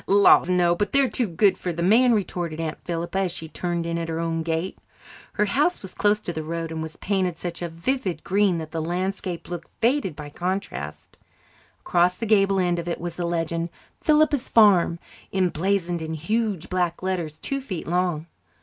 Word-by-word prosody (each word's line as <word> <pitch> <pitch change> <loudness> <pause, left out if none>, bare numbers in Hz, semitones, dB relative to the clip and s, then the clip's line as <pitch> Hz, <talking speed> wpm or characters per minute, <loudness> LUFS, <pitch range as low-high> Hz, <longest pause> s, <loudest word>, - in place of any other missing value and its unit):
"Laws, 200 -2 +6
no, 175 -1 +4
but 200 +3 -2
they're 275 -4 +3
too 245 - 0
good 190 +2 +2
for 180 - -2
the 170 0 -3
men," 230 +6 +5
retorted 175 -5 -2
Aunt 160 -1 -4
Philippa, 170 +2 -2
as 190 -2 0
she 160 -1 -7
turned 170 +1 -3
in 170 0 -1
at 165 0 -4
her 160 0 -2
own 165 -1 -1
gate. 165 +3 -2 0.5
Her 210 - +2
house 290 - +1
was 190 - -9
close 210 0 +2
to 175 - -4
the 160 - -3
road 165 +1 -4
and 160 0 -4
was 160 0 -7
painted 185 -4 0
such 175 0 -5
a 175 - -2
vivid 185 +4 -2
green 195 -2 +2
that 160 -1 -6
the 165 - -2
landscape 180 +1 -3
looked 175 -1 -6
faded 235 - +1
by 145 -1 -8
contrast. 180 - -4 0.6
Across 180 +1 +2
the 230 - -3
gable 195 -2 +3
end 175 -1 +1
of 170 - -5
it 170 - -2
was 175 0 -5
the 175 -1 -2
legend, 165 0 -1 0.3
"Philippa's 305 -3 +3
Farm," 195 -6 +5 0.3
emblazoned 180 -1 0
in 160 0 -3
huge 205 +2 -1
black 180 -1 -1
letters 170 -5 -2
two 275 0 -3
feet 190 -11 -5
long. 175 -2 0
175 Hz, 195 wpm, -24 LUFS, 165-200 Hz, 0.6 s, Laws